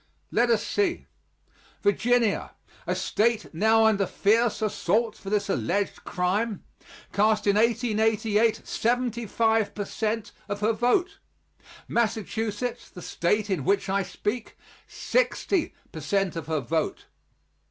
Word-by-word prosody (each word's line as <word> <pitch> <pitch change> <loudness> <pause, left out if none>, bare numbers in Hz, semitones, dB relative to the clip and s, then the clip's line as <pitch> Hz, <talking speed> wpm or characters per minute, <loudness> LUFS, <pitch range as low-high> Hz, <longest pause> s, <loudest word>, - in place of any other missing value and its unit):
Let 240 +1 +2
us 230 -2 +2
see. 380 -4 0 0.8
Virginia 230 +2 +1 0.3
a - - 0
state 225 -2 0
now 220 +6 +4
under 200 -3 +3
fierce 225 +5 +2
assault 215 +2 0
for 195 - -9
this 205 -1 0
alleged 200 0 -1
crime 195 +4 -1 0.5
cast 215 +1 +2
in 200 -1 +3
1888 225 -1 +2
seventy 240 -1 -1
five 220 -1 +1
per 205 - -3
cent 220 +1 -2 0.2
of 205 0 -3
her 220 +2 +2
vote; 350 - +1 0.7
Massachusetts, 225 +1 -2
the 180 - -11
State 210 +4 0
in 170 -8 0
which 195 +4 +1
I 195 +1 +2
speak, 210 +4 -4 0.3
sixty 405 -8 0 0.2
per 160 - -7
cent 195 +3 0
of 165 -3 -5
her 160 -2 0
vote. 155 +5 -2
215 Hz, 125 wpm, -26 LUFS, 200-230 Hz, 0.8 s, now